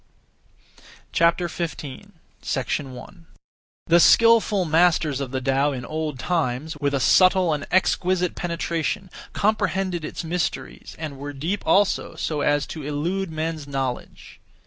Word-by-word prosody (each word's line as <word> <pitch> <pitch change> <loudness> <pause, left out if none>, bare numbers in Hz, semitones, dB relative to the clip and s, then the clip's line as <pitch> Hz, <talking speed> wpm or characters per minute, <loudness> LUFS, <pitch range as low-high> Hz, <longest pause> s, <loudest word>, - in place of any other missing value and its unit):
15. 170 +1 +3
1. 160 -3 -6 0.6
The 170 +1 +5
skilful 225 -1 +5
masters 160 -3 +2
(of 135 - -3
the 130 +1 -2
Tao) 135 +2 +1
in 130 -3 -5
old 155 -3 -3
times, 155 -1 -2
with 140 -1 0
a - - +1
subtle 185 +6 +4
and 145 -1 -4
exquisite 180 -1 +1
penetration, 170 +1 -3 0.2
comprehended 195 -4 0
its 155 - -5
mysteries, 170 +1 -4
and 150 -4 -6
were 145 +1 -6
deep 165 +9 -3
(also) 200 0 +2
so 150 -2 -2
as 145 0 +2
to 160 - -7
elude 165 +7 -2
men's 160 -1 -4
knowledge. 135 -3 -5
160 Hz, 125 wpm, -23 LUFS, 145-180 Hz, 0.6 s, The